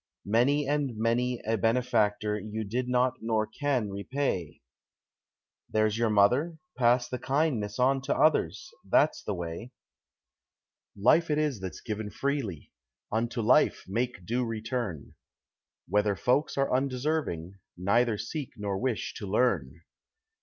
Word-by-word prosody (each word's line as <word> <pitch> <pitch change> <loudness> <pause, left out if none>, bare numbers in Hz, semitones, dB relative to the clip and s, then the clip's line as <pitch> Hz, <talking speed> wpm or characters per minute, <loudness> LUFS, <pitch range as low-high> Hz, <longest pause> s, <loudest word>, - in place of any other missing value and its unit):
Many 130 +7 +2
and 140 -5 -1
many 120 +2 +1
a 110 0 0
benefactor 110 -2 +1
you 110 +2 -4
did 125 +5 -2
not 125 0 +2
nor 110 -1 +1
can 120 -1 -1
repay 100 - -2 1.1
There's 110 -1 +2
your 115 0 +1
mother. 125 +11 +3 0.2
Pass 120 0 +3
the 125 - -4
kindness 135 -8 0
on 135 +1 +3
to 140 - 0
others 260 - +2
that's 145 -5 +2
the 105 - -2
way. 85 +8 -6 1.2
Life 155 +11 +4
it 150 - +1
is 150 -7 0
that's 95 -1 -6
given 105 -1 -4
freely. 110 - -3 0.4
Unto 115 +1 -1
life 125 +7 +4
make 115 -2 -2
due 120 +5 0
return. 115 - -4 0.7
Whether 105 +2 +2
folks 125 - +1
are 135 -2 +2
undeserving, 130 - -2 0.2
neither 110 +5 +2
seek 130 +6 -5
nor 100 -2 -2
wish 125 -4 -2
to 105 - -6
learn. 90 - 0
115 Hz, 130 wpm, -28 LUFS, 105-130 Hz, 1.2 s, Life